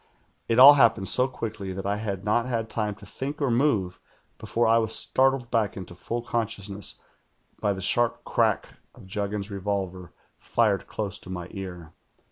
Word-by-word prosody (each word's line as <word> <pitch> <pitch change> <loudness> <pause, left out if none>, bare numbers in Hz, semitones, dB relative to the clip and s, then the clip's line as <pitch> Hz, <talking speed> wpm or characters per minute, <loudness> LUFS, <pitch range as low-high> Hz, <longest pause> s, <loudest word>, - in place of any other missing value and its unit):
1 115 - +1
1 - - +5
all 140 +3 +11
happened 115 -8 +3
so 125 +1 +4
quickly 110 -6 -6
that 95 +1 -6
I 100 +1 0
had 100 -2 -4
not 115 +3 +1
had 115 -3 -2
time 105 -2 -2
to 105 - -14
Lliink 140 +8 -5
or 140 -4 +1
move 115 -8 +1 0.4
before 115 +2 0
I 115 +1 +5
was 110 -1 +1
startled 130 -2 +2
back 110 -5 0
into 90 -2 -8
full 115 +7 -5
consciousness 105 -4 -3 0.6
by 105 - +1
the 95 -1 -6
sharp 120 +4 +2
crack - - 0 0.2
of - - -14
Juggins's 100 +1 -4
revolver 95 -3 -4 0.3
fired 105 -4 0
close 105 -2 -4
to - - -13
my 90 -1 -6
ear. 90 -4 -8
105 Hz, 175 wpm, -26 LUFS, 95-120 Hz, 0.6 s, all